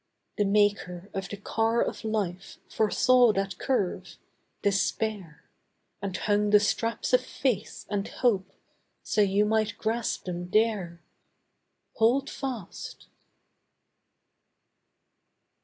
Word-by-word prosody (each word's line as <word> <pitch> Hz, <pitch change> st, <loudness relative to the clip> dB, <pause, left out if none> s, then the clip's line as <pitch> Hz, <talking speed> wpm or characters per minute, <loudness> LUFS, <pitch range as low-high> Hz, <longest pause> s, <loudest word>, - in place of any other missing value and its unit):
The 205 Hz, -, +3 dB
Maker 200 Hz, -2 st, +1 dB
of 195 Hz, 0 st, -4 dB
the 205 Hz, -, -6 dB
Car 225 Hz, +3 st, 0 dB
of -, -, -5 dB
Life 195 Hz, -4 st, -3 dB
Foresaw 245 Hz, +2 st, +4 dB
that 195 Hz, -1 st, -2 dB
curve—Despair, 200 Hz, -, -2 dB, 0.6 s
And 190 Hz, -1 st, -3 dB
hung 210 Hz, 0 st, +1 dB
the 210 Hz, 0 st, +7 dB
straps 230 Hz, +4 st, -1 dB
of 250 Hz, -, +6 dB
faith, 250 Hz, -5 st, -2 dB
and 205 Hz, -1 st, -2 dB
hope 195 Hz, -6 st, 0 dB, 0.5 s
So 210 Hz, -, +1 dB
you 200 Hz, +1 st, +3 dB
might 220 Hz, 0 st, 0 dB
grasp 230 Hz, +1 st, -2 dB
them 175 Hz, -1 st, -5 dB
there. 200 Hz, -6 st, +1 dB, 1.0 s
Hold 255 Hz, +5 st, +3 dB
fast! 250 Hz, -9 st, -6 dB
210 Hz, 100 wpm, -27 LUFS, 195-225 Hz, 1.0 s, the